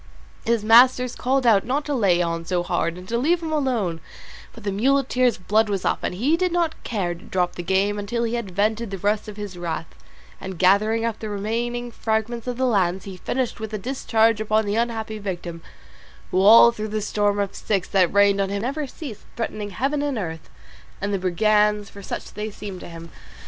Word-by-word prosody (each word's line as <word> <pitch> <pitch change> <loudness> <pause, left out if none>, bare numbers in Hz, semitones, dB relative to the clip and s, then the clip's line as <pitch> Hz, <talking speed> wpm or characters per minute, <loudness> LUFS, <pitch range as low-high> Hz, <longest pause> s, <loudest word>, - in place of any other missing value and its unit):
His 230 -2 +1
masters 250 +2 +6
called 260 +1 0
out 215 -4 +5
not 280 +4 -1
to 295 - -2
lay 190 -8 +3
on 165 0 -2
so 175 +1 -1
hard 175 -1 -1
and 180 0 -10
to 235 +3 -1
leave 335 +6 +1
him 320 - -3
alone, 235 - -1 0.5
but 225 - -13
the 200 - -1
muleteer's 255 +2 +2
blood 215 +4 +1
was 195 -2 -2
up, - - +1
and - - -2
he 265 - +2
did 365 +1 0
not 335 -2 -1
care 190 -6 -2
to 170 - -13
drop 180 -1 -1
the - - -5
game 195 +3 +1
until 235 +4 -2
he 230 0 -1
had 235 -4 -3
vented 215 +4 0
the 195 - -5
rest 205 +3 0
of 210 -1 -8
his 200 -4 -7
wrath, 165 -2 -4 0.5
and 190 -2 -6
gathering 215 +5 +3
up 230 -2 -2
the 215 - -5
remaining 235 +4 -3
fragments 220 +1 -2
of 245 -1 -3
the 260 - +1
lance 190 -6 +1
he 195 -2 -8
finished 245 +7 -3
with 220 -1 -5
a - - -1
discharge 225 -2 +1
upon 215 0 +1
the 205 - -1
unhappy 225 -2 -2
victim, 175 -4 -5 0.7
who 185 - +2
all 225 +4 +8
through 215 -2 -5
the 215 0 -2
storm 205 0 0
of 200 -1 -1
sticks 195 -4 -1
that 185 -3 +3
rained 200 0 +4
on 195 - 0
him 200 +1 -3
never 280 +4 -2
ceased 260 -5 -8
threatening 215 -3 -4
heaven, 275 +8 -1
and 290 -3 -1
earth, 165 -6 -5 0.5
and 200 +1 -2
the 195 - 0
brigands, 210 +3 +2
for 200 - -11
such - - -6
they 215 +1 -4
seemed 200 -2 -8
to - - -9
him. 165 0 -10
210 Hz, 210 wpm, -23 LUFS, 195-235 Hz, 0.7 s, all